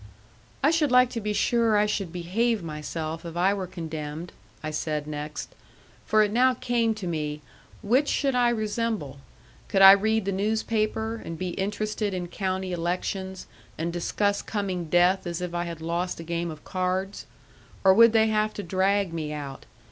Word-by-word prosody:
"I 290 - +5
should 315 -5 +2
like 250 0 +5
to 230 - -3
be 210 0 -2
sure 230 0 +2
I 210 - +4
should 200 -4 -2
behave 195 +5 0
myself 155 +1 -5
if 170 0 -7
I 190 +3 +3
were 195 -2 -3
condemned," 160 -1 -6 0.3
I 155 - -3
said 155 -1 -2
next. 150 0 -6 0.5
For 215 0 +5
it 205 - 0
now 255 +3 +4
came 235 -2 0
to 210 -3 -6
me 150 -3 -3 0.4
which 255 +8 +3
should 275 -2 +1
I 245 -1 +3
resemble? 215 - -2 0.5
Could 195 -1 +3
I 195 - +12
read 220 +1 +3
the 200 - 0
newspaper, 220 +2 -1
and 165 - -6
be 185 +1 -3
interested 210 +2 -2
in 175 -1 -4
county 190 0 -2
elections, 185 +2 -3 0.3
and 170 +2 -2
discuss 200 +4 0
coming 190 -5 -3
death 175 +3 +3
as 170 0 -3
if 180 -1 -4
I 175 0 -1
had 170 -2 -7
lost 170 +2 -2
a - - -6
game 170 +1 -2
of 155 -2 -9
cards? 185 +1 -2 0.6
Or 190 -1 +7
would 230 +3 +7
they 220 -1 +4
have 215 0 0
to 205 - -4
drag 190 0 +1
me 155 -2 -3
out? 140 -3 -7
190 Hz, 180 wpm, -26 LUFS, 170-215 Hz, 0.6 s, I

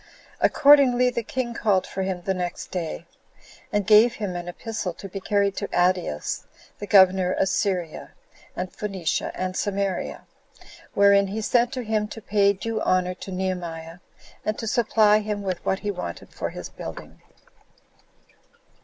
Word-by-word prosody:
Accordingly, 265 -4 +5
the 235 - -2
king 240 +1 -3
called 205 -4 +1
for 190 - -5
him 190 -2 -3
the 190 - 0
next 180 -1 -5
day, 170 -2 -4 0.7
and 205 -1 0
gave 220 +3 +6
him 200 -4 -4
an 175 0 -5
epistle 200 0 -4
to 195 - -8
be 195 +1 -6
carried 200 0 +1
to 200 - -3
Adeus, 180 - 0 0.3
the 205 - -6
governor 190 -2 +5
of 195 - +1
Syria, 180 -6 -2 0.5
and 180 0 -4
Phoenicia, 195 -6 -2
and 185 0 -3
Samaria; 200 -2 -2 0.7
wherein 200 0 +5
he 205 +3 -4
sent 240 +3 +2
to 255 - -3
him 215 -1 0
to 225 - -8
pay 200 -1 +3
due 220 +3 -3
honor 185 0 +1
to 190 - -9
Nehemiah, 175 -3 -4 0.4
and 215 0 -2
to - - -5
supply 215 -2 +3
him 210 -1 -3
with 185 -3 -3
what 190 - -1
he 205 - -1
wanted 175 - -7
for - - -3
his - - -7
building. - - -9
200 Hz, 155 wpm, -24 LUFS, 185-215 Hz, 0.7 s, gave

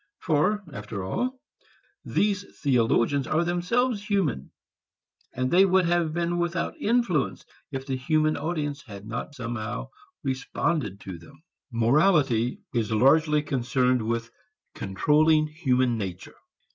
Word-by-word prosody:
For 180 +7 +1
after 105 -3 -6
all 255 - -2 0.6
these 205 -1 0 0.2
theologians 125 0 +2
are 155 +2 +2
themselves 200 +7 0
human, 170 - 0 0.8
and 130 0 -2
they 185 +2 +6
would 190 -1 +4
have 170 -2 +1
been 170 +1 -1
without 175 0 -1
influence 225 - +1 0.3
if 135 -1 -4
the 135 -1 -2
human 155 +3 +1
audience 145 -2 -3
had 100 -4 -11
not 120 +6 -5
somehow 115 -4 -4 0.3
responded 135 - -1
to 95 -3 -7
them. 140 - -17 0.3
Morality 125 - +2
is 115 -3 0
largely 150 +6 +4
concerned 125 -2 +1
with 115 +1 -2 0.4
controlling 155 +10 +3
human 130 -6 +1
nature. 95 -3 -6
145 Hz, 120 wpm, -26 LUFS, 115-170 Hz, 0.8 s, they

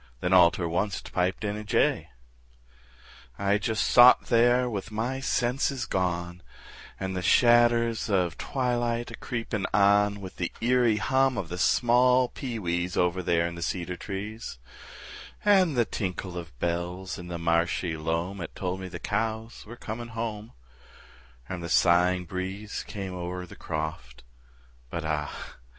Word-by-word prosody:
Then 90 +8 0
all 90 -2 +8
ter 85 - -4
onct 90 +4 -2
piped 90 +3 0
in 105 0 -1
a 105 - -6
jay. 105 - +1 1.3
I 100 +1 +1
just 110 0 0
sot 125 +1 +7
there 120 +1 +4
with 105 -3 -4
my 115 +5 -2
senses 130 0 0
gone, 90 -3 -2 0.6
And 95 -1 -3
the 90 - -2
shadders 120 +1 +4
of 90 -5 +1
twilight 120 -2 -1
a - - -6
creepin' 115 -4 -3
on, 100 0 +4
With 95 -2 -9
the 90 - -2
eerie 120 -2 +3
hum 130 +2 +2
of 90 - -3
the 90 +1 -5
small 125 +4 +4
pee 125 -4 -5
wees, 85 -2 -2
Over 90 +1 +1
there 85 -1 +1
in 85 - -3
the 85 - -8
cedar 90 +1 -3
trees, 105 - -6 0.9
And 185 -8 +4
the 120 - +4
tinkle 90 -3 -4
of 85 -7 -8
bells 90 +4 -3
in 90 - -8
the 85 -1 -4
marshy 85 0 0
loam 85 +5 -2
'At 85 - -7
told 95 0 -3
me 95 - -6
the 90 -1 -7
cows 110 +4 -3
were 120 +2 -10
coming 115 +2 -6
home, 110 -1 -5 0.9
And 90 -2 -5
the 85 - -5
sighing 90 +2 +3
breeze 95 +3 -5
came 95 -3 -5
o'er 90 0 -5
the - - -13
croft, 75 -6 -5 0.7
But - - -4
ah! 75 -1 -4
95 Hz, 155 wpm, -27 LUFS, 90-115 Hz, 1.3 s, all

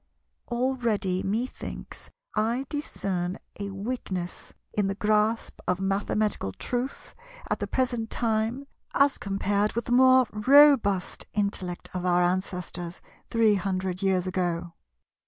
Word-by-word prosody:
Already 235 -7 0
methinks 225 +6 -4 0.3
I 230 +5 +1
discern 190 - -2 0.2
a 200 0 -3
weakness 195 -3 -4 0.2
in 205 -2 +1
the 195 - -1
grasp 215 +2 +1
of 180 0 +1
mathematical 195 - 0
truth 250 - -4 0.4
at - - +1
the - - -2
present 240 -3 -1
time 230 +3 0 0.3
as 280 0 +4
compared 200 +1 0
with 235 - -2
the - - -4
more 260 +1 +6
robust 235 -4 +5
intellect 195 -4 -2
of 180 -1 -3
our 180 -1 +3
ancestors 180 -1 -2 0.3
three 225 -2 +4
hundred 185 -1 -1
years 190 -2 +2
ago. 175 -2 -2
205 Hz, 120 wpm, -27 LUFS, 185-235 Hz, 0.4 s, more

